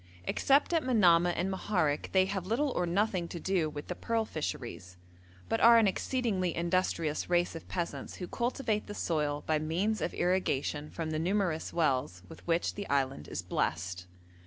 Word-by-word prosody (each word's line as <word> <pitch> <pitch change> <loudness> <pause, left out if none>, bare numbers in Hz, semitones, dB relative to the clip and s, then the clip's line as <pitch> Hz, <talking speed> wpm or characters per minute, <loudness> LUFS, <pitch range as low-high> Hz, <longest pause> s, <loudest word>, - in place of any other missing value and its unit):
Except 280 - +2
at 330 - +3
Manamah 175 - +4
and 185 +3 -1
Moharek 180 -6 0
they 190 -1 +4
have 190 -2 -3
little 265 +7 +1
or 180 - -1
nothing 185 -1 0
to 170 - -6
do 180 -3 0
with 150 -1 -7
the - - -4
pearl 225 +4 -1
fisheries, 115 - -5 0.5
but 225 - 0
are 235 0 +8
an 225 - +5
exceedingly 195 -4 0
industrious 170 -3 0
race 175 0 +2
of 165 - -8
peasants 175 -2 -4
who 180 - -6
cultivate 235 -2 -1
the 205 - -6
soil 150 -5 -1
by 155 -1 +1
means 180 +8 -1
of - - -2
irrigation 155 -5 0
from 160 -2 -4
the 155 - -1
numerous 180 -2 0
wells 130 - 0
with - - -12
which 170 0 +1
the 200 - -6
island 135 - 0
is - - -4
blessed. 90 0 -2
175 Hz, 175 wpm, -31 LUFS, 155-205 Hz, 0.5 s, are